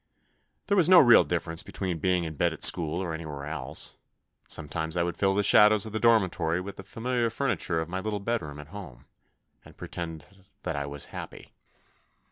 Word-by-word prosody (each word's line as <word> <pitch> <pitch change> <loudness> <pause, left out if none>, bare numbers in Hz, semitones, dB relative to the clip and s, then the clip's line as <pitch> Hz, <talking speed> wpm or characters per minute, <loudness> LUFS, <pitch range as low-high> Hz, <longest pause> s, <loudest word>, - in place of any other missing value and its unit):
There 200 - +1
was 180 -3 +4
no 185 - +8
real 120 -7 +8
differ 85 -1 -3
ence 85 +2 -1
between 95 -4 -4
being 90 +1 +1
in 80 -2 -5
bed 75 - 0
at - - -5
school 85 +1 +3
or 85 -3 -4
anywhere 75 -3 -6
else; 80 +2 -4 0.5
and - - -27
sometimes 80 +3 -3
I 85 - +2
would 85 0 -3
fill 95 -1 +1
the 105 - +2
shadows 105 +1 +6
of 110 - -8
the 110 - -1
dormitory 95 -7 +2
with 95 +1 -8
the 95 - -8
familiar 120 +3 -2
furniture 110 -9 -1
of 80 - -3
my 95 +2 -4
little 105 +1 -3
bedroom 100 -9 -3
at 75 0 -11
home, 90 -11 -10 0.6
and - - -17
pretend 80 -3 -7 0.4
that 90 -3 -3
I 70 0 -3
was 70 0 -6
happy. - - -9
90 Hz, 200 wpm, -27 LUFS, 80-105 Hz, 0.6 s, no